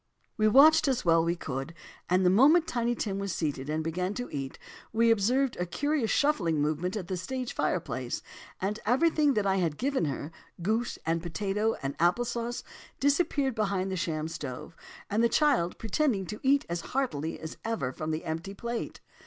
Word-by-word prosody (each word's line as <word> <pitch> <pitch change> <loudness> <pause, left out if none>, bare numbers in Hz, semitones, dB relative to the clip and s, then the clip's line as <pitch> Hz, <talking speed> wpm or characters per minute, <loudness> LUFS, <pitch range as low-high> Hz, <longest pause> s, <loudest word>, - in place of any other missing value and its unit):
"We 215 -1 +3
watched 300 +8 +7
as 255 -5 0
well 165 -1 +5
as - - -1
we 170 - +1
could, 135 0 -5 0.3
and 185 +1 +3
the 180 - +5
moment 295 - +6
Tiny 240 -5 0
Tim 200 -4 -2
was 200 -2 -3
seated, 145 -3 -2
and 155 +1 -1
began 180 +5 -2
to 245 0 -5
eat, 135 -2 -5 0.3
we 230 +1 +4
observed 245 +5 +2
a 180 - -2
curious 290 - 0
shuffling 190 - +2
movement 155 +7 -1
at 185 -5 -5
the 185 - -2
stage 255 +7 -4
fireplace, - - -2 0.4
and 205 +3 -2
everything 295 +3 +3
that 210 -2 +1
I 195 0 +2
had 165 -5 0
given 270 - 0
her, 145 +2 -4 0.3
goose 225 +5 0
and 165 +1 0
potatoes, 200 +6 -1
and 135 +1 -2
apple 175 +9 +3
sauce 235 0 -3 0.4
disappeared 285 -2 +2
behind 200 -3 -1
the - - -1
sham 160 -3 -2
stove, 150 -1 -7 0.4
the 230 +3 +3
child 255 - +2
pretending 225 -2 0
to 210 +4 -6
eat 275 +1 +3
as 170 0 -3
heartily 165 - -2
as 160 0 -7
ever 225 - -2
from 155 +3 -5
the 155 0 -3
empty 165 +5 -4
plate. 235 +3 -5
200 Hz, 185 wpm, -29 LUFS, 165-245 Hz, 0.4 s, watched